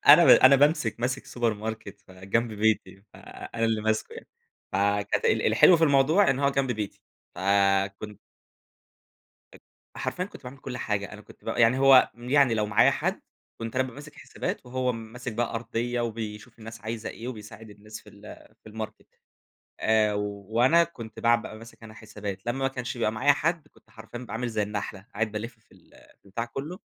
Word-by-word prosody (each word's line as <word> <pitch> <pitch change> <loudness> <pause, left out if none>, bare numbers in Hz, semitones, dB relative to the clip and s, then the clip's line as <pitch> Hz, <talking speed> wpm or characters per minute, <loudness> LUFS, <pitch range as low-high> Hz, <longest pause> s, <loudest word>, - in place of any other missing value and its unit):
أنا - - +10
ب - - +4
أنا 130 +1 +8
بامسك 145 -5 +2
ماسك 130 +2 -2
سوبر 120 -3 -1
ماركت 110 -1 -7
ف 95 - -22
جنب 100 +5 -2
بيتي، 105 -3 0
فأنا 115 0 -6
اللي 110 -1 +1
ماسكه 110 0 -1
يعني. - - -11 0.4
فكانت 100 +1 0
ال - - +2
الحلو 180 - +6
في 165 - +3
الموضوع 150 +7 +4
إن 130 - 0
هو 140 0 +2
جنب 135 -2 0
بيتي 105 -3 -6 0.3
فكن 100 +1 +1 1.4
أ - - -14 0.4
حرفيًا 180 - -2
كنت 200 - -12
باعمل 130 +2 -9
كُلّ 125 -1 -7
حاجة، 105 -3 -3
أنا 105 - -10
كنت - - -18
ب - - -7
يعني 120 +2 +3
هو 135 -1 +6
يعني 125 +1 +2
لو 105 -1 0
معايا 100 - +4
حد - - -2 0.4
كنت 115 +2 -5
أنا 130 - +2
بابقى 130 -2 -7
ماسك 145 +1 -11
حسابات - - -6
وهو 125 0 -1
ماسك 115 +2 -7
بقى 115 +2 -2
أرضية 120 +1 -2
وبيشوف 110 0 -6
الناس 115 0 -10
عايزة 110 0 -5
إيه 120 - -7
وبيساعد 110 -2 -10
الناس 105 +1 -11
في - - -19
ال 100 +1 -13
في - - -13
الماركت، 110 0 -7 0.7
آآ، 110 -1 +2
وأنا 110 - +2
كنت 115 -10 -9
بع 120 0 +4
بابقى 115 -2 -7
ماسك 115 0 -14
أنا 110 -1 -11
حسابات، 105 -3 -8
لمّا 120 +2 -2
ما 135 - +1
كانش 125 -1 -5
بيبقى 110 -2 +1
معايا 130 +6 +3
حد 160 +1 -2
كنت - - -27
حرفيًا 115 +2 -10
بابقى 125 - -9
عامل 120 +2 -2
زي 110 -2 -1
النحلة، 100 -1 -5
قاعد 110 0 -1
بالفّ 110 +3 -6
في 110 - -36
ال - - -22 0.3
البتاع 110 +4 -4
كلّه، 150 - -7
115 Hz, 185 wpm, -26 LUFS, 105-125 Hz, 1.4 s, أنا